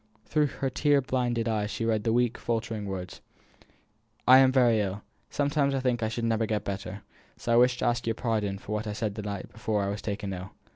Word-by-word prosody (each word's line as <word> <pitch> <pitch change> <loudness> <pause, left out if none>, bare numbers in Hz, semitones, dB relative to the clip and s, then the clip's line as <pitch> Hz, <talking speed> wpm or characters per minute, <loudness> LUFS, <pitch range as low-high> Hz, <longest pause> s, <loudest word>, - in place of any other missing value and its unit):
Through 150 -2 +2
her 135 0 -3
tear 145 0 +3
blinded 125 -3 -1
eyes 105 -2 0
she 115 - -3
read 110 -1 0
the 115 - +2
weak, 120 0 +2
faltering 115 -3 -2
words: 95 -2 -6 1.1
"I 130 +1 +9
am 130 -1 +6
very 120 -4 +4
ill. 95 -2 -2
I - - -9 0.3
sometimes 140 -1 +1
think 125 -3 0
I 110 - 0
shall 115 +1 -4
never 115 -1 +1
get 105 -1 -1
better, 100 0 -5 0.3
so 120 - -1
I - - +5
wish 125 +1 +5
to - - -2
ask 120 0 0
your 115 - +1
pardon 105 -5 -1
for 100 - -10
what 105 +1 -2
I 105 - -2
said 105 -1 -2
the 105 - -5
night 100 -2 -5
before 110 -2 -1
I 100 - -1
was 100 +1 -4
taken 100 -2 -3
ill. 90 +1 -7
115 Hz, 230 wpm, -28 LUFS, 105-125 Hz, 1.1 s, I